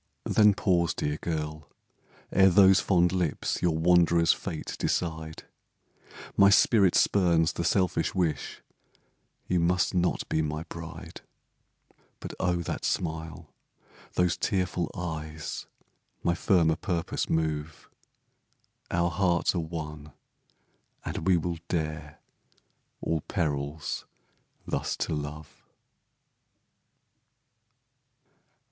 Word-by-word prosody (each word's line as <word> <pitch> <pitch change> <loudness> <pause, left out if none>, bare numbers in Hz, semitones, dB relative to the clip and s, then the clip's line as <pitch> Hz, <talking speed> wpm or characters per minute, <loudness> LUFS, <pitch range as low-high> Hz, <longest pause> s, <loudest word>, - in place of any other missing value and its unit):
Then 105 -2 +5
pause, 85 -5 +1
dear 75 +1 -2
girl! 75 -2 -4 0.6
ere 95 0 +6
those 95 +1 +6
fond 90 -3 +3
lips 90 -5 -1
Your 85 -3 +1
wanderer's 85 0 +4
fate 80 -5 -6
decide; 80 -2 -2 0.9
My 100 0 +6
spirit 100 -2 +4
spurns 85 -5 +3
the - - -3
selfish 90 -1 +1
wish 85 -5 -2 0.8
You 90 - +1
must 90 +2 +1
not 90 -1 0
be 80 - 0
my 75 +1 -3
bride. 85 +1 -9 1.0
But - - -7
oh, 90 -2 0
that - - -4
smile 80 -2 -3 0.6
those 90 -1 +1
tearful 90 -4 -1
eyes, 80 -4 -5 0.6
My 85 - +2
firmer 85 -3 +2
purpose 85 -5 -2
move 80 -1 -2 1.0
Our 85 0 +1
hearts 90 -1 +1
are 90 - -1
one, 75 -2 -6 0.9
and 80 - -4
we 95 -2 +5
will 85 0 -3
dare 80 -3 -3 0.8
All 80 -1 -1
perils 75 -4 -3 0.6
thus - - -2
to - - -3
love! 75 +1 -7
85 Hz, 100 wpm, -28 LUFS, 80-90 Hz, 1.0 s, ere